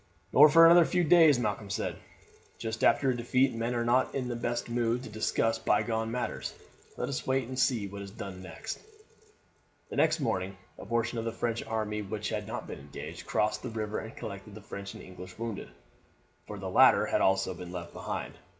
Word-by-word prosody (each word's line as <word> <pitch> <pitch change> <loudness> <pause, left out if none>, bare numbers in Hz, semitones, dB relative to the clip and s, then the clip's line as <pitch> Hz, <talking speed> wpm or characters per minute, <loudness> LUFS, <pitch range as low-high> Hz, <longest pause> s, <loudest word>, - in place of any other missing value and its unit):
"Nor 150 +3 +9
for 165 +2 +8
another 170 +1 +8
few 180 +2 +1
days," 160 -3 +6
Malcolm 110 -4 -2
said. 95 - -2 0.6
"Just 110 0 -4
after 135 -2 +4
a - - -1
defeat 125 +3 +2
men 115 +2 -2
are 120 0 0
not 125 +2 +2
in 130 -2 -2
the 120 - -2
best 120 0 -2
mood 120 +1 0
to - - -8
discuss 115 +1 0
bygone 110 +1 +1
matters. 125 +2 -3 0.4
Let - - -2
us 135 - -4
wait 130 -2 +1
and 130 0 -5
see 125 -5 +2
what 100 +1 -7
is 100 - -7
done 95 -1 -8
next." 220 - -7 1.1
The - - -5
next 160 +1 +3
morning 95 -8 -2 0.2
a - - -9
portion 115 +1 0
of 115 - -4
the 115 - -1
French 115 0 -2
army 105 -1 -2
which 105 +1 -4
had 105 -2 -3
not - - -5
been - - -7
engaged 70 +1 -9
crossed 105 0 0
the 125 - -5
river 110 -1 -3
and 110 - -8
collected 100 +1 -7
the 110 - -10
French 100 -1 -8
and - - -10
English 90 0 -11
wounded, 115 - -5 0.8
for - - -6
the - - -5
latter - - +6
had - - +1
also 95 0 +2
been 90 -1 -9
left 85 -1 -7
behind. - - -5
115 Hz, 205 wpm, -30 LUFS, 100-125 Hz, 1.1 s, Nor